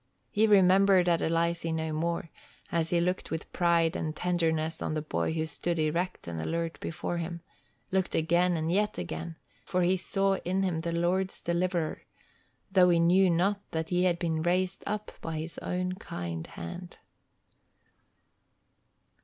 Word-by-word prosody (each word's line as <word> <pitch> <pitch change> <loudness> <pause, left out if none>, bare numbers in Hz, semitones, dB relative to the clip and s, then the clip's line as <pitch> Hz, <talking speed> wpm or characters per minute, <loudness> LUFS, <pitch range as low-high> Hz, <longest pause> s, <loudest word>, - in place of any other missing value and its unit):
He 220 +2 +3
remembered 195 -2 +6
Adelizy 165 0 +1
no 160 -1 -2
more, 165 +1 -2 0.4
as 165 -1 0
he 175 - +2
looked 180 +2 -1
with 160 0 -5
pride 170 -1 +3
and 155 -1 -3
tenderness 165 -2 0
on 155 - -2
the 155 - -1
boy 155 - -1
who 160 -1 -1
stood 170 +2 -2
erect 165 - -1
and 85 -1 -4
alert 165 - -2
before 170 +2 -3
him, 170 0 -4 0.5
looked 190 -1 0
again 170 +2 +2
and 160 +1 -1
yet 210 +3 +1
again, 80 -1 -5 0.3
for 180 0 0
he 180 +2 +3
saw 195 +1 +1
in 190 +2 0
him 180 -4 0
the 170 +1 -2
Lord's 180 +3 0
deliverer, 170 -1 -1 0.7
though 185 -2 +6
he 170 -1 +4
knew 180 +3 +5
not 195 +4 +2
that 160 0 -3
he 180 +1 +3
had 175 -2 +2
been 165 -2 -1
raised 180 +2 0
up 210 0 -3
by 165 -1 -4
his 160 +2 -5
own 180 0 -2
kind 85 - -5
hand. 175 - -8
170 Hz, 155 wpm, -29 LUFS, 160-185 Hz, 0.7 s, remembered